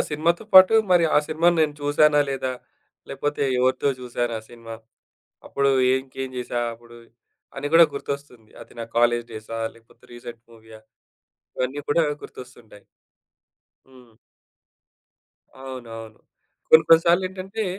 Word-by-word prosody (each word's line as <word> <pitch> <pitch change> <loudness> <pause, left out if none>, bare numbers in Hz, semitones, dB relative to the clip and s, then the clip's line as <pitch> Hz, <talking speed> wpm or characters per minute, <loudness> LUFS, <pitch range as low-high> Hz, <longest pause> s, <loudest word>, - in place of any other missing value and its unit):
సినిమాతో 165 +6 -1
పాటు 185 +3 +8 0.2
మరి 175 -2 +4
ఆ - - +7
సినిమాని 170 +2 +2
నేను 150 -1 -1
చూసానా, 145 +1 +3
లేదా? 130 -1 -3 0.6
లేపోతే 145 0 -3 0.2
ఎవరితో 130 +2 +1
చూసాను 120 -1 -3
ఆ - - -9
సినిమా? 115 -1 -10 0.7
అప్పుడు 140 0 0 0.3
ఇంకేం 130 0 -7
చేశా 120 -1 -3
అప్పుడు, 120 0 -17 0.6
అని - - -4
గూడా 165 0 +8
గుర్తొస్తుంది. 140 -6 -7
అది - - -18
నా 115 - -6
కాలేజ్ 120 0 +2
డేసా, 110 +1 -7 0.2
లేకపోతే 115 0 -24
రీసెంట్ 120 -1 -11
మూవీయా, 110 -1 -16 0.8
ఇవన్నీ 130 +3 -3
కూడా 165 +3 +3 0.2
గుర్తొస్తుంటాయి. 120 -5 -14 1.0
హ్మ్. 125 -4 -20 1.4
అవునవును. 115 -4 -10 0.5
కొన్ని 160 0 +7
కొన్ని 165 0 +7
సార్లేంటంటే, 190 +4 -1
130 Hz, 120 wpm, -23 LUFS, 120-155 Hz, 1.4 s, పాటు